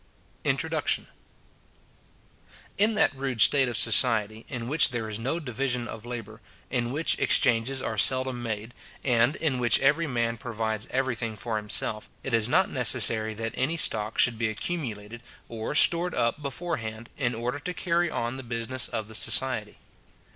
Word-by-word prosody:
INTRODUCTION. - - 0 1.7
In 215 +2 +4
that 200 - +2
rude 135 -3 -4
state 135 +2 +5
of 120 - -2
society, 110 -3 +3
in 120 -4 -5
which 150 +3 +4
there 120 -4 -4
is 110 0 -5
no 135 +9 -2
division 125 -3 -3
of 110 0 -9
labour, 115 -2 -7 0.3
in 120 -2 -1
which 155 +4 0
exchanges 125 +2 +1
are 110 -2 -2
seldom 130 0 +2
made, 110 0 -5 0.3
and 120 +2 +2
in 140 -6 -1
which 120 -2 +3
every 150 +5 +2
man 115 -3 -1
provides 110 -2 -3
every 130 -1 -1
thing 115 -1 -4
for 110 +1 -4
himself, 105 0 -1
it - - -4
is 115 0 +3
not 180 +6 +3
necessary 110 -4 +3
that 115 +1 -4
any 155 +6 -1
stock 110 -7 0
should 120 -2 +3
be 115 -2 0
accumulated, 115 -4 -5 0.3
or 115 +4 -5
stored 170 +3 +5
up 120 +6 0
before 145 +5 -4
hand, 110 +1 -8
in 125 -4 -1
order 120 +4 -3
to 180 - -5
carry 175 -1 0
on 120 -1 -3
the - - -6
business 120 +1 -2
of 110 -3 -5
the 110 - -13
society. 110 -1 +2
120 Hz, 165 wpm, -26 LUFS, 110-135 Hz, 1.7 s, state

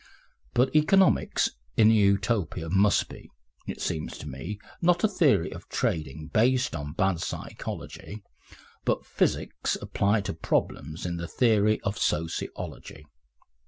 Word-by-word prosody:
But 130 +3 +2
economics 185 +5 +4 0.3
in 110 0 +7
Utopia 100 -5 +1
must 100 +2 +3
be, - - -12 0.4
it - - -5
seems 80 - -3
to - - -8
me, 75 +10 -6 0.2
not 175 0 +3
a - - +6
theory 145 - +2
of - - -11
trading 75 -1 -2
based 125 +4 +3
on 75 0 -5
bad 95 0 +1
psychology, 105 0 -6 0.6
but - - 0
physics - - 0
applied 100 +1 0
to 100 - -2
problems 80 0 -2
in 85 -1 -2
the 85 0 -4
theory 110 -2 +3
of 100 +2 -3
sociology. 80 -2 -3
100 Hz, 125 wpm, -27 LUFS, 80-115 Hz, 0.6 s, in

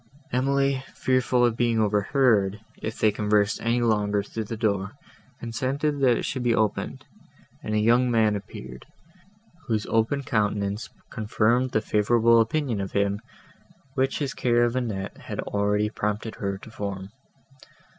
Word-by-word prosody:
Emily, 135 +1 +1
fearful 130 -1 +2
of 120 -2 +1
being 115 -1 +1
overheard, 105 -1 +2 0.2
if 110 +1 -4
they 110 - +3
conversed 105 0 +1
any 120 +1 +1
longer 105 -3 +1
through 110 +2 -5
the 115 +2 -5
door, 100 -3 0 0.5
consented 135 +5 -2
that 125 -4 +4
it - - -3
should 130 - -3
be 120 -2 +2
opened, 110 -2 -1 0.6
and 105 - -3
a - - +3
young 120 +3 +4
man 110 -3 +3
appeared, 65 -10 -9 0.8
whose 110 -3 0
open 115 +5 +1
countenance 105 -2 -1 0.2
confirmed 115 +4 +1
the 110 - +1
favourable 115 +2 +4
opinion 115 -2 -1
of 95 - -5
him, 100 +1 +1 0.7
which 135 0 0
his 140 -3 -2
care 120 -1 +2
of 120 +1 +1
Annette 105 -6 -3
had - - -7
already 105 +1 0
prompted 105 +1 -2
her 100 -1 -2
to 110 - -13
form. 100 -2 -5
110 Hz, 145 wpm, -25 LUFS, 105-120 Hz, 0.8 s, that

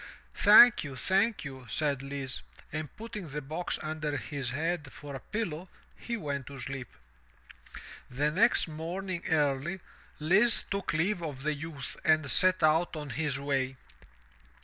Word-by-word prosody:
"Thank 215 +3 +8
you, 140 -3 -6
thank 195 - +1
you," 130 -3 -8
said 145 -1 0
Lise, 135 -1 -5 0.3
and, 155 -1 -4
putting 210 -5 -7
the 150 0 -4
box 155 +5 -3
under 155 -1 -2
his 135 -1 -3
head 155 +1 -2
for 145 -1 -9
a 135 - -5
pillow, 185 - -4 0.3
he 235 -1 -4
went 140 - -4
to 140 - -8
sleep. 135 0 -5 1.2
The 145 +4 0
next 215 +6 +4
morning 170 +3 -4
early, 150 +3 +1 0.4
Lise 200 +10 +3
took 200 -3 -1
leave 175 +4 +1
of 145 -5 -5
the 155 +1 +1
youth 145 -2 -6
and 155 -2 +3
set 185 -2 +3
out 160 +3 +3
on 150 -3 -5
his 140 +1 0
way. 135 -2 -1
155 Hz, 150 wpm, -30 LUFS, 140-175 Hz, 1.2 s, Thank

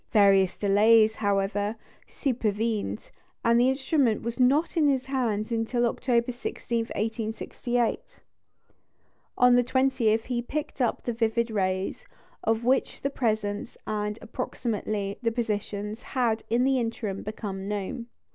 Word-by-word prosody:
Various 195 -3 +4
delays, 215 +2 +5
however, 205 0 0 0.3
supervened, 220 - -2 0.3
and 235 0 +5
the 250 +2 +5
instrument 265 -4 +1
was 235 +2 -4
not 280 +8 +3
in 315 -3 +4
his 265 -2 +1
hands 235 -5 -1
until 235 +1 +1
October 240 0 +1
16, 235 -1 -3
1868. 225 +2 -2 1.1
On 250 0 +6
the 245 0 +5
20th 255 -4 +2
he 245 -1 -2
picked 285 +2 -4
up 240 - 0
the 240 - -2
vivid 230 0 0
rays, 190 -2 -1 0.4
of 225 +1 0
which 260 +2 +1
the 275 - 0
presence 215 -5 -2
and 210 0 -2
(approximately) 215 -4 -3
the 230 -2 +1
positions 210 -2 -3
had 235 -4 0
in 235 +2 +2
the 265 0 +3
interim 225 -4 -3
become 200 -2 -5
known. 210 +4 -4
225 Hz, 130 wpm, -27 LUFS, 210-245 Hz, 1.1 s, On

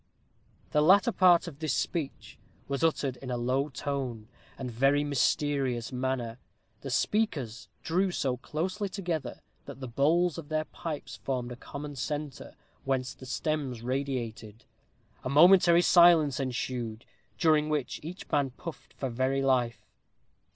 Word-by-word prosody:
The 150 - +3
latter 195 +9 +5
part 180 -4 +5
of 150 -4 -9
this 155 -4 -1
speech 155 -5 -3 0.3
was 140 0 -2
uttered 140 -5 +1
in 130 +1 -8
a 125 - -1
low 130 +4 0
tone, 130 -5 -4 0.3
and 130 -2 -5
very 135 +5 +3
mysterious 140 -3 0
manner. 125 -2 -2 0.4
The - - -7
speakers 145 - -1
drew 185 +4 +1
so 130 -7 -1
closely 185 - -3
together, 175 -6 -4 0.2
that - - -9
the 130 - -5
bowls 160 +8 +2
of 150 -2 -10
their 155 0 0
pipes 155 -2 -6
formed 125 -2 -3
a - - -5
common 145 +3 -8
centre, 145 +1 -5 0.3
whence 130 -1 -1
the 130 - -12
stems 135 -5 -2
radiated. 120 -4 -4 0.6
A - - -3
momentary 175 +3 +6
silence 170 -7 +6
ensued, 120 -3 -3 0.3
during 155 -3 +3
which 150 -4 -2
each 170 +5 -8
man 140 -2 +2
puffed 160 +5 -10
for 135 - -3
very 130 +3 0
life. 125 -3 +1
140 Hz, 140 wpm, -29 LUFS, 125-160 Hz, 0.6 s, momentary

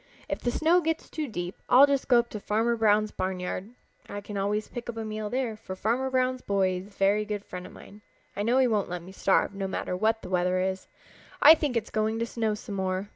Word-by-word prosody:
If - - -3
the 245 - -1
snow 330 +8 +3
gets 325 0 -2
too 310 -3 -3
deep 175 -5 -6
I'll 265 +3 +8
just 280 -2 0
go 245 - +6
up 235 0 +2
to 210 - -5
Farmer 225 +4 +1
Brown's 215 -1 +3
barnyard. 185 +1 -3 0.4
I 205 - -5
can 205 0 -8
always 205 +2 -1
pick 240 0 -7
up 230 - -5
a 225 - -3
meal 215 -1 -4
there, 245 -2 -1
for 210 -3 -8
Farmer 235 +7 0
Brown's 255 -1 0
boy 195 -2 +1
is 185 +2 -8
a - - -16
very 200 +1 +2
good 210 -1 -5
friend 180 0 -7
of - - -13
mine. 205 +2 -14 0.3
I 205 - -2
know 235 +5 +2
he 265 - +5
won't 215 -6 0
let 175 -1 -5
me 185 - -11
starve, 195 +1 +1
no 195 -1 -3
matter 180 - -3
what 220 +4 +1
the - - -7
weather 180 0 +1
is. 190 0 -2 0.5
I 305 - +10
think 295 -6 -1
it 225 - 0
is - - -15
going 220 +1 0
to 230 - -1
snow 225 -2 -1
some 210 - -8
more. 190 +1 -2
215 Hz, 250 wpm, -27 LUFS, 195-235 Hz, 0.5 s, I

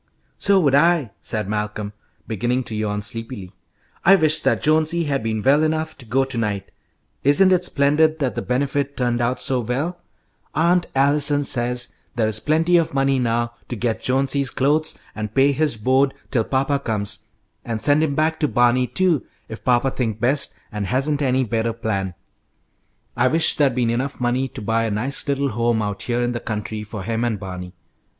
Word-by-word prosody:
"So 200 -1 +3
would 140 -5 +2
I," 150 - +3
said 110 -3 -3
Malcolm, 105 0 -3 0.3
beginning 120 +4 -1
to 110 - -4
yawn 105 -1 -2
sleepily. 115 -3 -6 0.5
"I 195 +3 +7
wish 155 -4 +4
that - - 0
Jonesy 160 +2 +2
had 140 -3 -1
been 110 -1 -2
well 140 +3 +4
enough 155 0 -1
to 125 - -9
go 135 +4 +2
to 130 -3 -2
night. 100 -3 -3 0.5
Isn't 185 +8 +5
it 180 -1 +3
splendid 155 +1 +2
that 135 -5 -1
the - - -3
Benefit 140 +2 -1
turned 120 -1 0
out 120 +2 0
so 130 -1 +1
well? 135 +10 -2 0.6
Aunt 175 +2 +2
Allison 145 +1 +3
says 125 -2 -1 0.2
there 110 -2 +1
is 110 0 -1
plenty 165 +5 +2
of 165 -4 0
money 135 -1 +2
now 120 -1 0
to 120 - -4
get 115 0 -2
Jonesy's 135 +1 +1
clothes 150 +5 +1 0.2
and 105 0 -6
pay 135 +1 +5
his 145 -3 +1
board 130 +5 +2 0.2
till 115 -4 +1
papa 135 +1 0
comes, 110 -5 -3 0.4
and 115 -2 -3
send 145 +5 +3
him 150 -3 0
back 160 +2 +1
to 150 - +2
Barney, 120 0 +3
too, 175 -5 +1 0.3
if 110 - -8
papa 125 +1 +2
thinks 110 -5 -2
best 135 +5 +1
and 105 -2 -3
hasn't 140 +6 0
any 130 -1 +2
better 115 -1 -1
plan." 100 -5 -3 1.0
"I - - +3
wish 160 +4 +2
there'd 140 -5 +2
been 120 -2 +1
enough 130 +4 -2
money 125 +2 0
to 130 -3 -9
buy 115 +2 +1
a - - -1
nice 125 +9 -3
little 140 0 0
home 115 0 0
out 105 -1 -4
here 120 0 -1
in 120 - 0
the 120 - -3
country 110 -1 -4
for 105 -2 -7
him 115 +2 -2
and 115 -4 -1
Barney. 90 -2 -7
130 Hz, 185 wpm, -21 LUFS, 115-145 Hz, 1.0 s, I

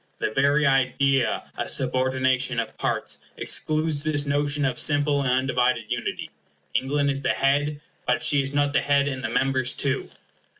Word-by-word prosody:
The - - -2
very 140 +5 +2
idea 135 -1 +2
of - - -1
subordination 130 -1 0
of 115 -1 -4
parts - - -2
excludes 155 -1 0
this 145 -2 0
notion 145 0 0
of 125 -2 0
simple 145 -1 +2
and 135 - -1
undivided 125 -3 0
unity. 120 -1 -3 0.4
England 140 +1 +1
is 135 0 -1
the - - -1
head; 145 +2 0 0.3
but 125 - +1
she 145 - +3
is 135 0 -4
not 145 0 +1
the - - +3
head 140 0 +2
and 130 -2 -4
the 110 - -2
members 130 +1 +1
too. 135 -1 -1
135 Hz, 165 wpm, -24 LUFS, 130-145 Hz, 0.4 s, she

